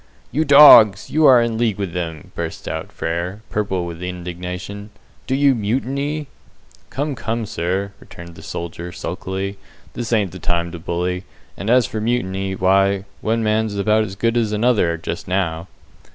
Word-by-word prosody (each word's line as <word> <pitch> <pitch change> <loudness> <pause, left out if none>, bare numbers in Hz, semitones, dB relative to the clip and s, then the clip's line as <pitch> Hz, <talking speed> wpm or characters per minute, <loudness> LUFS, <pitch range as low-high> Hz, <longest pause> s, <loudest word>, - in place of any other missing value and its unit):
"You 155 +5 +1
dogs, 130 -8 +8
you 155 0 +4
are 130 -2 +8
in 115 -1 -2
league 115 -4 +1
with 100 -4 -4
them," 80 -4 -5
bursts - - -5
out - - -4
Frere, 90 +5 -4
purple 95 -4 -1
with 85 0 -7
indignation. 90 +3 -6 0.4
"Do 130 - 0
you 140 0 +4
mutiny?" 135 +7 -2 0.6
"Come, 145 +2 -2
come, 115 -2 -3
sir," 95 +2 -2
returned 85 0 -12
the - - -13
soldier, 85 +1 -6
sulkily, 95 +3 -5 0.3
"this 120 -1 -5
ain't 105 -5 +1
the 90 - -9
time 85 0 -1
to 85 - -7
bully; 90 +2 -2 0.3
and, 100 - -5
as 125 0 +5
for 110 - -4
mutiny, 95 -5 -1
why, 95 +1 +2 0.2
one 115 +1 0
man's 110 -1 0
about 105 +2 +2
as 95 -3 -6
good 115 +3 0
as 110 -3 +1
another 105 -6 +2
just 85 +1 -6
now." 90 -3 -1
100 Hz, 165 wpm, -20 LUFS, 90-115 Hz, 0.6 s, dogs